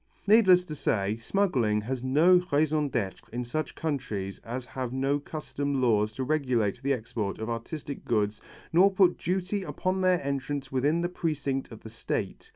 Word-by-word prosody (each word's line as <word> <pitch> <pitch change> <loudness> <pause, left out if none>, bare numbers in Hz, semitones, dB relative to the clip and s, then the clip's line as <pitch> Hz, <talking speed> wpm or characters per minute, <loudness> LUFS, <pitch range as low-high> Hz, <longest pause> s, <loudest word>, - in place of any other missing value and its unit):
Needless 195 -4 +6
to 155 - -6
say 105 -7 0
smuggling 115 - +1
has 125 +3 -4
no 165 +8 +5
raison 150 0 +2
d'être 110 -8 -3
in 125 +1 -3
such 155 +6 -3
countries 110 -11 -3
as 125 +2 -6
have 130 -1 -5
no 135 +2 0
custom 145 -2 -3
laws 110 -4 +2
to 130 - -3
regulate 125 -7 0
the 140 +1 0
export 110 -5 -2
of 110 +1 -4
artistic 140 +5 -5
goods 105 -2 0 0.3
nor 185 +4 +7
put 190 -2 +3
duty 190 +3 -1
upon 185 0 -2
their 185 -1 +3
entrance 140 0 -3
within 145 +6 +1
the 175 - -1
precinct 145 -7 -2
of 110 - -10
the 110 - -9
State. 115 - -4
135 Hz, 165 wpm, -28 LUFS, 115-160 Hz, 0.3 s, nor